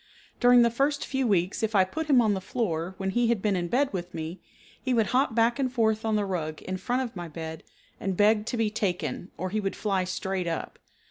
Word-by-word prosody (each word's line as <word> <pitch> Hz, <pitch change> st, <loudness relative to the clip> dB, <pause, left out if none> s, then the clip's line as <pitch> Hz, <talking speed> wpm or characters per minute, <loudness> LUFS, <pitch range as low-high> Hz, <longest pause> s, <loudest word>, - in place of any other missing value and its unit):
During 245 Hz, 0 st, +7 dB
the 235 Hz, -, +3 dB
first 280 Hz, +4 st, 0 dB
few 265 Hz, -2 st, 0 dB
weeks 185 Hz, -2 st, +1 dB
if 220 Hz, -1 st, -1 dB
I 190 Hz, -, +6 dB
put 315 Hz, +12 st, -4 dB
him 270 Hz, -5 st, +6 dB
on 215 Hz, -3 st, +3 dB
the 190 Hz, -, -2 dB
floor 185 Hz, -5 st, -2 dB
when 190 Hz, -1 st, -2 dB
he 240 Hz, +3 st, +2 dB
had 235 Hz, -2 st, +2 dB
been 205 Hz, 0 st, +1 dB
in 175 Hz, -1 st, -1 dB
bed 260 Hz, +8 st, +1 dB
with 180 Hz, -1 st, -5 dB
me, 160 Hz, +3 st, -5 dB, 0.4 s
he 255 Hz, -2 st, 0 dB
would 225 Hz, -2 st, +3 dB
hop 255 Hz, -2 st, +2 dB
back 235 Hz, +3 st, +3 dB
and 260 Hz, -2 st, 0 dB
forth 220 Hz, -3 st, +1 dB
on 220 Hz, -1 st, +1 dB
the 210 Hz, -1 st, +1 dB
rug 160 Hz, -5 st, -3 dB
in 185 Hz, 0 st, -3 dB
front 250 Hz, +6 st, -1 dB
of 240 Hz, -4 st, -7 dB
my 175 Hz, -1 st, -5 dB
bed, 160 Hz, 0 st, -7 dB, 0.4 s
and 195 Hz, -2 st, -2 dB
beg 210 Hz, +1 st, +4 dB
to 245 Hz, -, -2 dB
be 220 Hz, -2 st, +1 dB
taken, 190 Hz, -4 st, -2 dB
or 185 Hz, 0 st, -3 dB
he 215 Hz, -, 0 dB
would 195 Hz, -2 st, -2 dB
fly 195 Hz, -3 st, 0 dB
straight 185 Hz, 0 st, -2 dB
up. 165 Hz, -, -4 dB
210 Hz, 245 wpm, -27 LUFS, 185-240 Hz, 0.4 s, During